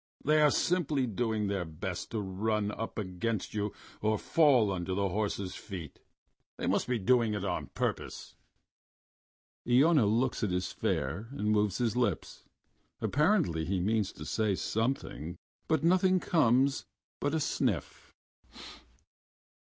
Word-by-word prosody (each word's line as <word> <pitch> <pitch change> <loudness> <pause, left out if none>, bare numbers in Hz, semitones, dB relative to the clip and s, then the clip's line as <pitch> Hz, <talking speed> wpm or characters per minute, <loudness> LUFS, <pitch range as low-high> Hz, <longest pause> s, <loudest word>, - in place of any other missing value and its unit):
"They 155 +1 +4
are 150 - +6
simply 150 -5 +1
doing 110 -1 -1
their 100 -2 -1
best 80 -2 -5
to 110 - -2
run 105 +2 -1
up 115 +1 -5
against 105 +2 -3
you 105 -1 -1 0.3
or 110 0 +2
fall 130 -7 +4
under 95 0 -2
the 100 0 0
horse's 100 -1 -2
feet. 85 -8 -8 0.6
They - - -3
must - - +1
be 125 -1 +1
doing 115 0 +2
it 105 - -3
on - - -2
purpose." - - -4 1.4
Iona 135 -1 +5
looks 120 +5 +1
as 105 - +1
his 90 0 -1
fare 85 +12 -2
and 105 -6 -1
moves 105 -2 +2
his 120 -2 0
lips.... 125 -1 -1 0.5
Apparently 150 - +2
he 95 +3 -1
means 105 +1 +1
to 75 - -9
say 105 +2 0
something, 105 - -2 0.3
but 155 -2 +1
nothing 185 +2 +4
comes 135 -5 +2 0.3
but 145 - 0
a - - +1
sniff. 130 - -2
110 Hz, 135 wpm, -31 LUFS, 100-135 Hz, 1.4 s, are